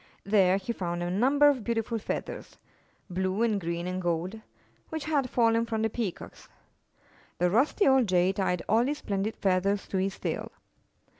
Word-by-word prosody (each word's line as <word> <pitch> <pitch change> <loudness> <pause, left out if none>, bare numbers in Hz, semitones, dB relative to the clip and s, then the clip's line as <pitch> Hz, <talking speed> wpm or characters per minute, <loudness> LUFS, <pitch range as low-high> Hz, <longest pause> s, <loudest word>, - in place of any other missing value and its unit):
There 195 -2 +3
he 200 +4 -4
found 175 -4 -3
a 175 - -2
number 270 +9 +4
of 270 -5 +2
beautiful 230 0 -1
feathers - - -5 0.3
— - - -37
blue 190 +4 0
and 215 -4 +1
green 170 0 -3
and 185 +1 -3
gold 175 +5 -2 0.2
— - - -36
which 315 -2 -4
had 285 -5 0
fallen 230 -1 +3
from 220 -1 -1
the 220 - 0
Peacocks. 215 -7 -5 0.9
The 180 0 +2
rusty 270 - +3
old 265 -3 +4
Jay 180 0 +3
tied 180 -3 -1
all 225 +2 +4
these 290 +2 -1
splendid 205 -3 -2
feathers 195 +1 0
to 195 - -1
his 190 +1 -1
tail. - - -4
205 Hz, 175 wpm, -28 LUFS, 185-235 Hz, 0.9 s, number